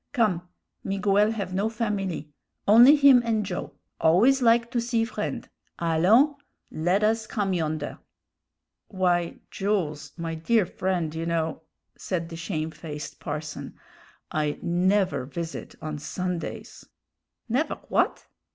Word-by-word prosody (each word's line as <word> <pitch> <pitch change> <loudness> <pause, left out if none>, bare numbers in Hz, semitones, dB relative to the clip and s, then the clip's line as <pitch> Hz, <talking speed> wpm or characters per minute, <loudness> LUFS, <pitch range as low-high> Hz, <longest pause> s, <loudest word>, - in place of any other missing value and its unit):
Come; 185 -9 +1 0.3
Miguel 200 +1 +2
have 200 -5 -3
no 200 +4 +1
familie; 200 -9 -3 0.3
only 240 +8 +9
him 280 -4 +7
and 220 -3 0
Joe 175 -6 -5 0.3
always 225 +12 +4
like 235 0 +4
to 240 -2 0
see 230 -1 0
friend; 235 - -4 0.3
allons, 185 - +4 0.4
led 180 +6 +1
us 220 0 +1
come 200 -3 -1
yonder." 155 -3 -2 0.9
"Why, 175 -3 0 0.2
Jools, 175 -7 -2
my 165 -1 -3
dear 195 +6 +2
friend, 175 -4 -2
you 165 +1 -3
know," 160 -1 -1 0.3
said 170 -3 -3
the 165 - -7
shamefaced 160 -3 -5
parson, 150 +1 -6 0.6
"I 150 -1 -1
never 185 -1 +1
visit 165 +5 -6
on 155 -1 -4
Sundays." 180 +3 -5 0.6
"Never 255 +7 0
w'at?" - - -1
185 Hz, 120 wpm, -26 LUFS, 165-220 Hz, 0.9 s, only